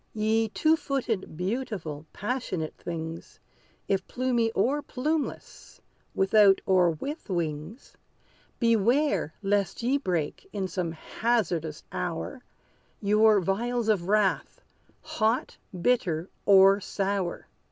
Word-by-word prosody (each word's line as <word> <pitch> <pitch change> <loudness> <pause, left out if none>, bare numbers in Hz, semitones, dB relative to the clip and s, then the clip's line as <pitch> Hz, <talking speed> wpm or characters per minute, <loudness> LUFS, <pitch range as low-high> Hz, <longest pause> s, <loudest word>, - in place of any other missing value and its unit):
Ye 220 +1 +1
two 315 +8 +3
footed, 235 - -3
beautiful, 180 - -4
passionate 205 -8 -3
things, 165 -1 -7 0.5
If 190 -1 0
plumy 245 -3 0
or 265 +9 +1
plumeless 295 +3 -4 0.4
without, 195 0 +5
or 185 -2 +4
with 275 - -5
wings, 165 - -4 0.6
Beware, 230 - +2
lest 200 +1 0
ye 265 +4 +2
break, 175 - -3
in 195 -2 -2
some 180 -2 -3
hazardous 170 -5 -1
hour, 180 +9 -4 0.6
Your 210 +1 +4
vials 230 +5 -1
of 185 -5 +1
wrath, 205 -1 +1 0.4
hot, 225 +2 -1
or 185 - -8
bitter, 180 -6 +1 0.2
or 195 0 +7
sour! 195 -2 -2
200 Hz, 105 wpm, -27 LUFS, 175-235 Hz, 0.6 s, or